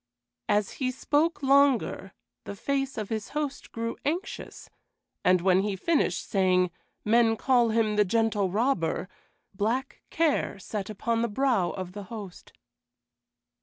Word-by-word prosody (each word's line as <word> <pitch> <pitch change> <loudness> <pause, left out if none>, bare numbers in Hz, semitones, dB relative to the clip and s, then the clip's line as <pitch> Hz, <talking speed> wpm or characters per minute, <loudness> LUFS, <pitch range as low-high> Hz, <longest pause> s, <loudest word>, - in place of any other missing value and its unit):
As 205 -1 +2
he 260 -2 -2
spoke 290 +5 0
longer, 270 -8 +3 0.3
the 200 - -6
face 270 +4 -2
of 215 -2 -4
his 220 -2 -3
host 290 -2 -4
grew 230 0 -4
anxious, 335 +7 -4 0.6
and 180 -1 +4
when 185 +1 +4
he 200 0 -1
finished, 310 - 0
saying, 185 -2 +2 0.3
"Men 225 +1 +4
call 245 -2 +3
him 220 -1 +1
the 210 - +6
Gentle 210 -1 +1
Robber," 195 -4 0 0.5
black 230 +7 -2
care 320 -9 +1
sat 200 +1 -5
upon 230 +2 -1
the 235 - +1
brow 230 -5 +1
of 185 -2 -6
the 205 +1 -8
host. 200 -3 -9
225 Hz, 135 wpm, -27 LUFS, 195-265 Hz, 0.6 s, the